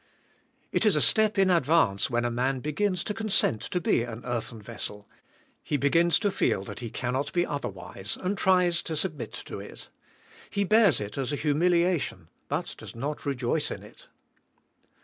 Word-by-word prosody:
It - - +2
is - - +5
a - - +3
step 215 -2 +4
in 190 -1 +4
advance 155 - +3
when 120 -1 0
a 120 - 0
man 130 +3 0
begins 175 +7 -1
to 210 - -3
con 220 0 -4
sent 115 - +2
to 180 - -2
be 160 - +2
an 115 0 -6
earthen 120 -1 -3
vessel. 105 -1 -6 0.5
He 145 - -1
begins 165 +4 +3
to 205 -2 +1
feel 100 - 0
he 120 -2 -6
cannot 130 +5 -2
be 175 0 +2
otherwise, 95 -7 -4
and 190 +2 -1
tries 180 -3 +3
to 160 - -4
submit 155 -4 -2
to - - -6
it. - - -10 0.6
He 200 - 0
bears 205 - +5
it 105 +5 -5
as 135 +1 -1
a - - 0
humiliation 165 - +1 0.2
but - - -2
does - - -10
not 145 +5 -4
rejoice 135 +2 0
in - - -6
it. - - -15
145 Hz, 175 wpm, -27 LUFS, 120-180 Hz, 0.6 s, is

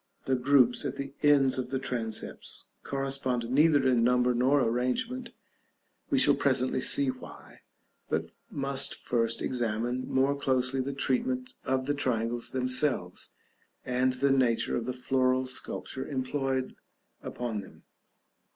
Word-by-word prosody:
The 135 - 0
groups 125 -1 +3
at - - -3
the 140 0 -6
ends 140 -3 +4
of 125 - -3
the 135 - -1
transepts 115 -4 -3 0.2
correspond 135 -3 -1
neither 145 0 +4
in 125 -3 +3
number 125 +1 +3
nor 130 +4 +3
arrangement; 230 - -1 0.8
we 285 - +2
shall 145 - +5
presently 130 -2 +1
see 135 0 +3
why, 130 - -13 0.5
but - - -2 0.2
must 135 -1 -1
first 115 -1 -1
examine 120 +1 -2
more 135 +2 +2
closely 130 -1 0
the 135 +2 -3
treatment 130 -2 -1
of 130 0 0
the 145 - 0
triangles 120 -4 -1
themselves, 130 -7 0 0.6
and 125 +1 +1
the 135 +2 +1
nature 125 -4 +2
of 120 0 -3
the 125 - -1
floral 130 0 +1
sculpture 130 0 -3
employed 130 -1 -2 0.5
upon 115 -4 -4
them. 95 - -15
130 Hz, 135 wpm, -29 LUFS, 125-135 Hz, 0.8 s, shall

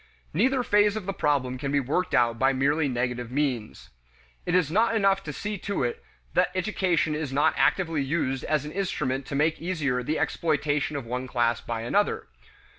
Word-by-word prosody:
Neither 250 - +2
phase 210 -2 +3
of 215 -4 -4
the 195 - -2
problem 130 -6 0
can 140 0 -3
be 145 - +3
worked 155 +8 -1
out 115 -1 +2
by 135 +1 +3
merely 145 +3 +2
negative 125 -2 -2
means. 120 - -2 0.6
It 175 - +1
is 170 -5 +2
not 225 +5 +3
enough 195 -2 +3
to 150 - -4
see 205 +6 -4
to 200 -6 -2
it 120 - -3 0.3
that - - +3
education 185 -4 +1
is 150 -3 -3
not 145 +3 +3
actively 165 -5 +2
used 135 -2 -1
as 150 -2 0
an 150 - -6
instrument 140 -8 -2
to 140 - -4
make 155 +3 +1
easier 150 -8 -1
the 150 +6 -1
exploitation 150 -2 0
of 140 -4 -4
one 125 +2 -4
class 120 -2 +1
by 115 -1 -4
another. 200 - 0
150 Hz, 190 wpm, -26 LUFS, 130-180 Hz, 0.6 s, phase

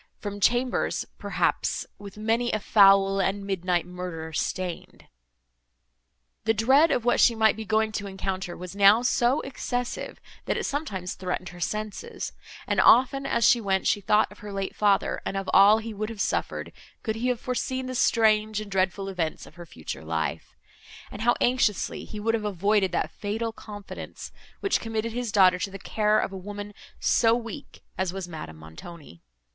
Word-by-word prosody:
—from 205 -1 -6
chambers, 245 +4 +1
perhaps - - -1
With 205 0 -10
many 225 +3 0
a 215 - 0
foul, 195 -1 +5
and 195 +1 -1
midnight 180 -3 0
murder 180 -3 -6
stain'd. 180 +2 -4 1.4
The 225 0 +2
dread 265 +9 +5
of 240 - 0
what 245 - +3
she 235 - +5
might 220 -1 +4
be 220 +1 -6
going 220 +1 +1
to 205 -1 -4
encounter 190 -1 -4
was 180 +1 -8
now 200 +4 +6
so 245 +3 +2
excessive, 245 -2 -4 0.3
that - - -1
it - - -2
sometimes 205 - -3
threatened 180 -1 -4
her 175 - -12
senses; 215 - -4 0.3
and, - - +2
often 265 +3 +5
as 235 - +3
she 240 - +5
went, 190 -2 0
she 205 - +2
thought 210 +2 +2
of 205 - -15
her 210 -1 -8
late 195 -1 -4
father 205 -2 +1
and 195 - -3
of 195 -1 -4
all 200 +3 +7
he 225 0 -5
would 215 +1 -4
have 225 -3 -8
suffered, - - -2 0.3
could 220 -1 -2
he 240 +3 -1
have 250 -2 0
foreseen 260 0 -2
the 255 - -5
strange 215 -3 +2
and 210 -2 -8
dreadful 190 +1 0
events 175 -5 -3
of - - -15
her 175 -1 -11
future 80 - -7
life; 80 0 -3 0.6
and 205 - -7
how 240 +2 +3
anxiously 245 -5 +1
he 210 - -8
would 225 +2 0
have 225 -2 -1
avoided 200 -1 +1
that - - -1
fatal 225 +2 -3
confidence, 205 -3 -9 0.3
which 395 - +1
committed 225 0 -3
his 245 -2 -3
daughter 185 -3 +5
to 195 - -2
the 195 - -8
care 210 +2 +1
of - - 0
a - - -7
woman 205 +2 -7 0.3
so 225 -1 +3
weak 230 -4 -8 0.2
as 190 -2 0
was 190 -1 -5
Madame 155 - -8
Montoni. 85 - -12
205 Hz, 180 wpm, -26 LUFS, 190-225 Hz, 1.4 s, all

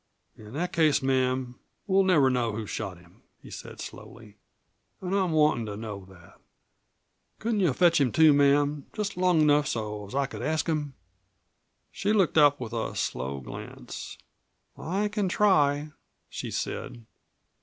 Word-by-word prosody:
"In 105 +1 -13
that 175 +5 -3
case, 155 -4 +3
ma'am, 130 -1 0 0.3
we'll 195 -1 +3
never 155 -8 +4
know 120 -3 0
who 110 +1 -4
shot 100 -3 -5
him," 85 0 -21 0.2
he - - -14
said - - -9
slowly. 105 -2 -10 0.6
"An' 185 0 -4
I'm 190 -3 +1
wantin' 150 -7 +2
to 100 -1 -5
know 105 -3 -7
that. 90 -3 -18 1.0
Couldn't 225 -1 -1
you 180 -6 +3
fetch 165 +2 +3
him 130 -4 +2
to, 160 -2 +6
ma'am 145 0 +2
just 210 -1 -3
long 180 -3 +3
enough 150 -1 +4
so's 105 -2 -4
I 140 0 +2
could 135 - -8
ask 155 0 0
him?" 150 -4 -2 1.0
She 205 +2 -1
looked 190 -6 +3
up 145 -1 +5
with 120 -2 -6
a 115 -1 -3
slow 65 +2 -3
glance. 60 - -8 0.6
"I 195 +6 -2
can 210 -2 -1
try," 150 -7 +2 0.4
she - - -5
said. 120 -1 -5
145 Hz, 155 wpm, -27 LUFS, 115-170 Hz, 1.0 s, to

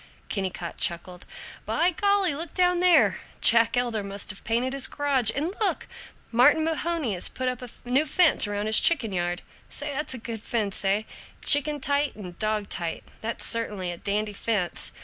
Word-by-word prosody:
Kennicott 185 -3 -4
chuckled, 175 +1 -2 0.4
"By 350 +2 +1
golly, 400 -1 +1
look 320 +3 -6
down 360 -1 +2
there! 355 -2 +4 0.2
Jack 230 +1 +4
Elder 240 -3 0
must 200 +1 -1
have 205 - -14
painted 240 +4 -1
his 275 -1 +3
garage. 275 -6 +1
And 310 +7 -2
look! 420 - 0 0.4
Martin 260 +7 +4
Mahoney 325 -6 -2
has 180 - 0
put 255 0 -4
up 250 -1 -3
a 250 - -8 0.2
new 270 +5 +2
fence 335 - +5
around 205 0 -3
his 220 0 +6
chicken 255 - +2
yard. 175 0 -2 0.3
Say, 290 0 -3
that's 285 -1 -1
a - - -6
good 225 -2 -7
fence, 215 -4 -1
eh? 200 +2 +1 0.4
Chicken 295 0 +4
tight 285 +1 0
and 180 -5 -10
dog 215 -1 -1
tight. 170 -2 -4 0.2
That's 225 +1 -2
certainly 205 -6 -1
a 175 - -7
dandy 210 +3 -2
fence. 200 -4 -2
235 Hz, 175 wpm, -25 LUFS, 205-295 Hz, 0.4 s, his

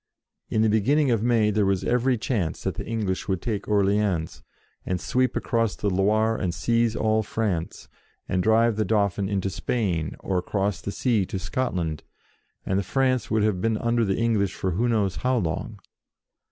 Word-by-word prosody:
In 110 - +2
the - - +4
beginning 130 +7 +2
of 115 -3 +1
May 115 -2 +3
there 105 0 +2
was 95 -1 +1
every 125 +1 +2
chance 105 - -2
that - - -1
the - - -6
English 105 -5 -2
would 95 -3 0
take 105 -2 -3
Orleans, 100 -5 +1 0.4
and 90 -1 -2
sweep 130 +6 0
across 115 -3 0
the 100 - -1
Loire, 110 +4 +2
and 90 -4 -2
seize 115 +3 +1
all 110 0 +2
France, 100 -6 -3 0.4
and 90 - 0
drive 110 +2 +3
the 110 - +2
Dauphin 100 -3 0
into 95 -1 -1
Spain, 95 -5 -2
or 95 -2 0
across 100 +2 -2
the 100 - -4
sea 115 -2 +1
to - - -4
Scotland, 90 - -2 0.6
and 95 +1 0
France 130 +4 0
would 110 -1 +2
have 105 -4 +1
been 115 +1 +1
under 115 +1 +1
the 95 -3 0
English 110 -5 +1
for 95 - -2
who 115 +8 0
knows 105 -5 0
how 130 0 +1
long. 80 -7 -3
105 Hz, 180 wpm, -25 LUFS, 95-115 Hz, 0.6 s, the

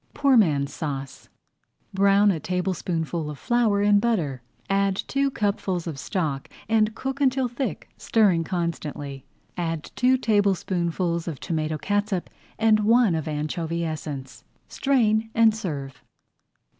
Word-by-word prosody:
POOR 275 -2 +4
MAN'S 145 - +3
SAUCE 140 -4 -5 0.6
Brown 200 +1 +4
a 165 - -2
tablespoonful 175 -3 -2
of 150 - -7
flour 230 - +2
in 205 0 +5
butter, 170 - 0 0.3
add 195 0 +1
two 275 +7 0
cupfuls 200 -7 -1
of 155 -5 -5
stock, 145 -4 -2 0.2
and 220 0 +2
cook 270 +3 -4
until 265 -1 +2
thick, 240 - -4
stirring 195 -7 +3
constantly. 155 -6 -4 0.3
Add 165 -3 -3
two 255 +1 +3
tablespoonfuls 185 -6 0
of 155 -5 -4
tomato 155 -1 -2
catsup 205 +1 -1 0.3
and 220 -1 +4
one 225 -1 +4
of 160 -2 -2
anchovy 165 +2 -2
essence. 150 -4 -6 0.2
Strain 225 -5 +1
and 225 -1 +5
serve. 145 -11 -5
185 Hz, 125 wpm, -25 LUFS, 160-220 Hz, 0.6 s, in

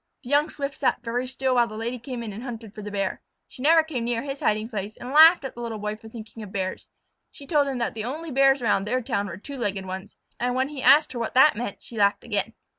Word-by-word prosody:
The 250 - -8
young 290 +2 +3
Swift 280 -1 -5
sat 270 - +1
very 245 +2 -2
still 260 0 -1
while 240 -1 +4
the 215 -1 -8
Lady 235 +3 -3
came 245 0 -6
in 215 -3 -6
and 215 - -7
hunted 230 -4 -7
for 215 - -8
the 210 - -6
Bear. 195 -2 -2 0.3
She 255 - -13
never 320 +3 +6
came 285 -7 -4
near 235 0 -1
his 275 -1 -5
hiding 215 +1 +1
place, 210 -2 -5
and 250 - -7
laughed 320 +1 +8
at 265 - -5
the 240 - -9
Little 230 -2 -4
Boy 210 0 -3
for 220 +1 -13
thinking 225 0 -10
of 205 -3 -8
Bears. 190 -1 -4 0.4
She 285 - -12
told 290 -2 +2
him 270 -2 -2
that 235 - -1
the 220 - -4
only 310 +6 -5
Bears 270 0 +4
around 200 -3 +2
their 255 +3 0
town 215 -4 -1
were 170 -3 -7
two 275 +8 -8
legged 200 -5 -2
ones, 190 +2 -7 0.2
and 245 +1 0
when 260 +2 +1
he 290 -3 -6
asked 285 +4 +6
her 240 - -4
what 230 - -3
that 265 0 +7
meant 220 -2 -5
she 230 - -8
laughed 200 0 +3
again. 210 -1 -2
240 Hz, 270 wpm, -25 LUFS, 215-270 Hz, 0.4 s, laughed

